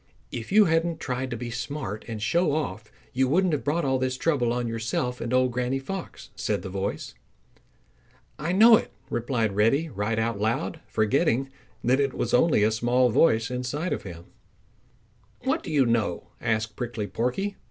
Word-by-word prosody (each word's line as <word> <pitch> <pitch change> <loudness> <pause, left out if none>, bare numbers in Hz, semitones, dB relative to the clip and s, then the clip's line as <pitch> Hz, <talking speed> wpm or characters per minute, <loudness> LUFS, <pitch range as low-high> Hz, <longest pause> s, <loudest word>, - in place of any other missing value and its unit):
"If 115 -2 -6
you 210 +1 +7
hadn't 165 0 +1
tried 130 0 -3
to 120 - -4
be 120 +1 -5
smart 120 -3 -5
and 115 -2 -5
show 165 +8 +1
off 110 -8 -3 0.2
you 130 +1 +2
wouldn't 175 +5 +2
have 150 - -1
brought 150 +2 0
all 130 -1 +1
this 130 0 -1
trouble 130 -6 +1
on 120 0 -1
yourself 115 +2 -2
and 120 - -3
Old 130 0 +3
Granny 125 +2 -1
Fox," 180 +7 -7
said - - -2
the 95 - -5
voice. 100 +1 -3 1.3
"I 155 +3 -1
know 220 +4 +8
it," - - -5 0.2
replied 115 -4 -1
Reddy 135 +10 +2
right 110 -1 -2
out 110 -2 -1
loud, 120 +10 -1
forgetting 135 +4 +1 0.3
that 130 +3 +3
it 140 -2 0
was 120 - -2
only 125 -4 +4
a 110 - +3
small 120 +2 +2
voice 115 -3 +3
inside 130 +7 -2
of - - -3
him. 85 -3 -9 1.2
"What - - 0
do - - -7
you 140 -4 +4
know?" 115 -7 0
asked 110 -2 -1
Prickly 120 -3 -3
Porky. 125 - -2
125 Hz, 175 wpm, -26 LUFS, 115-145 Hz, 1.3 s, know